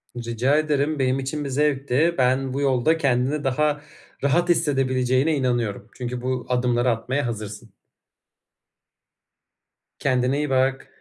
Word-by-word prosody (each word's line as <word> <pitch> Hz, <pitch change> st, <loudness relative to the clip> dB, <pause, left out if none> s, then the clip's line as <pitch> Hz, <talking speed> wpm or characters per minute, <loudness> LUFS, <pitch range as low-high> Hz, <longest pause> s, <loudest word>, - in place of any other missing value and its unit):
Rica 120 Hz, +3 st, 0 dB
ederim 150 Hz, 0 st, 0 dB
benim 130 Hz, 0 st, +1 dB
için 140 Hz, +3 st, -3 dB
bir -, -, -3 dB
zevkti. 145 Hz, +3 st, +1 dB
Ben 130 Hz, 0 st, +1 dB
bu 140 Hz, -, -2 dB
yolda 140 Hz, +3 st, +2 dB
kendini 140 Hz, 0 st, 0 dB
daha 150 Hz, +2 st, 0 dB, 0.4 s
rahat 170 Hz, +5 st, +2 dB
hissedebileceğine 135 Hz, -2 st, +2 dB
inanıyorum. 120 Hz, -6 st, -1 dB
Çünkü 125 Hz, -1 st, -5 dB
bu 125 Hz, -1 st, -2 dB
adımları 125 Hz, 0 st, +1 dB
atmaya 125 Hz, +4 st, -1 dB
hazırsın. 110 Hz, 0 st, -6 dB, 2.3 s
Kendine 130 Hz, 0 st, +1 dB
iyi 150 Hz, 0 st, -1 dB
bak. 135 Hz, 0 st, +1 dB
130 Hz, 120 wpm, -23 LUFS, 125-145 Hz, 2.3 s, yolda